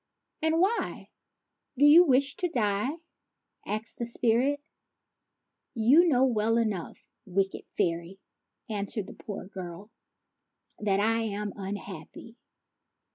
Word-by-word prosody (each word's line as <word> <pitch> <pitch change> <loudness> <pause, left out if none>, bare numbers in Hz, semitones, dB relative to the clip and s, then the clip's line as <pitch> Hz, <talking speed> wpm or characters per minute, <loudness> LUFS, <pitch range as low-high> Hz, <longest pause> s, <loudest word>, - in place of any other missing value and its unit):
" - - -54
And 320 +1 +2
why 400 +6 0 0.7
do 285 - +5
v^u 330 +4 +8
wish 275 +1 +3
to 360 - -1
die? 210 -3 0 0.4
" - - -42
asked 220 - -5
the 235 - -2
sprite. 245 +5 +1 1.2
"You 265 +10 +5
know 265 -4 +4
well 225 -2 +2
enough, 215 -7 -3 0.2
wicked 195 +1 -1
fairy," 170 +3 -2 0.5
answered 205 -1 -3
the - - -10
poor 205 - -7
girl, 185 +2 -9 0.4
" - - -55
that 200 -2 +1
I 225 +2 +2
am 210 -2 -3
unhappy. 195 +1 -8
220 Hz, 125 wpm, -28 LUFS, 195-260 Hz, 1.2 s, v^u